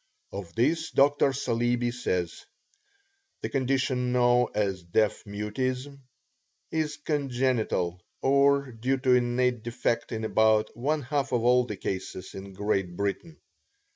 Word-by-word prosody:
Of 95 -4 -7
this 160 +7 +1
Dr. 140 0 +4
Saleeby 120 -2 0
says: 90 -8 -2 1.0
"The - - -3
condition 130 -2 0
known 125 0 +4
as 100 -3 0
deaf 100 +5 0
mutism 125 +7 -3 0.7
is 155 -2 -1
congenital 125 - -1 0.2
or 140 0 +3
due 125 +4 -1
to 130 -1 +3
innate 125 -1 +2
defect 115 0 -2
in 110 -1 -3
about 110 0 +3
one 145 +5 -1
half 140 +1 -1
of 120 -2 +1
all 125 +1 +4
the 105 - -5
cases 95 0 -5
in 95 0 -8
Great 95 -3 -1
Britain." 100 - -3
120 Hz, 125 wpm, -27 LUFS, 105-135 Hz, 1.0 s, Dr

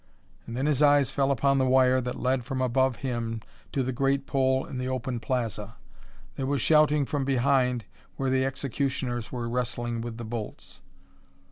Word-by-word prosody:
And 115 - -5
then 135 - 0
his 150 -2 +1
eyes 145 -3 +5
fell 135 -1 +1
upon 140 0 +2
the 130 - +3
wire 130 0 +4
that 125 0 -4
led 130 -1 +1
from 130 +2 -4
above 130 0 +2
him 115 -3 -2 0.3
to 135 - 0
the 130 - -1
great 135 +2 0
pole 130 -1 +1
in 130 - -6
the 125 - -2
open 130 -1 -2
plaza. 115 -3 -3 0.6
There 135 - -2
was 140 0 0
shouting 150 +1 +4
from 145 0 -2
behind 130 -3 +2 0.3
where 135 -1 -1
the 130 0 +2
executioners 135 -3 -2
were 120 -2 -3
wrestling 120 -1 -2
with 115 -1 -6
the 120 - -6
bolts. 110 -1 -7
130 Hz, 175 wpm, -27 LUFS, 120-135 Hz, 0.6 s, eyes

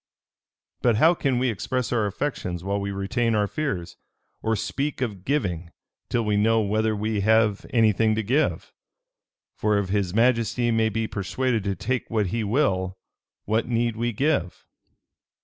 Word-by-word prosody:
"But 120 -3 +3
how 160 +10 +5
can 135 -6 0
we 125 0 +1
express 125 +4 -2
our 110 -3 +1
affections 95 -6 -3
while 100 +1 -1
we 100 - -3
retain 110 +4 0
our 105 -1 +2
fears; 100 - -3 0.4
or 110 0 0
speak 140 +7 -2
of 105 -8 -4
giving, 90 - -1 0.4
till 115 -2 0
we 105 -1 +1
know 115 +2 +3
whether 110 +1 +1
we 105 0 -1
have 110 0 +2
any 115 -3 +4
thing 110 +2 +2
to 110 - -1
give? 135 +9 0 0.8
For 105 -1 +1
if 100 -2 -1
his 100 -2 0
majesty 120 +2 +2
may 110 -1 +2
be 110 +1 -1
persuaded 115 +3 -1
to 100 -1 -1
take 120 +7 -2
what 110 -2 +1
he 115 -1 0
will, 95 -6 0 0.5
what 110 +2 0
need 120 -1 0
we 120 +1 -1
give? 115 - -1
110 Hz, 165 wpm, -25 LUFS, 100-120 Hz, 0.8 s, how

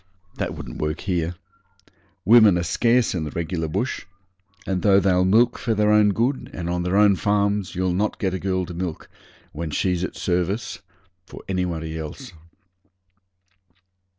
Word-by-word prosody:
That - - -3
wouldn't - - -8
work 75 +1 -2
here. 90 -3 -2 0.9
Women 110 -5 +7
are 85 - -1
scarce 120 +7 +2
in 85 -4 -2
the 75 - -4
regular 80 +1 -3
bush, 115 +11 -3 0.6
and 95 -2 -1
though 100 -2 +5
they'll 90 -1 +2
milk 115 +6 +3
for 115 -2 -1
their 105 0 +3
own 105 -1 +5
good 120 +7 -1
and 85 -1 -4
on 90 0 -1
their 90 +2 0
own 105 -1 +5
farms, 100 +1 0
you'll 90 0 0
not 105 +4 -1
get 95 -2 -1
a 95 - -2
girl 95 -1 -1
to 90 - -8
milk, 85 -2 -5 0.4
when 80 +1 -5
she's 90 +3 0
at - - -4
service, 90 +5 -2 0.5
for - - -11
anybody 85 -4 -3
else. 90 - -8
95 Hz, 160 wpm, -23 LUFS, 85-105 Hz, 0.9 s, Women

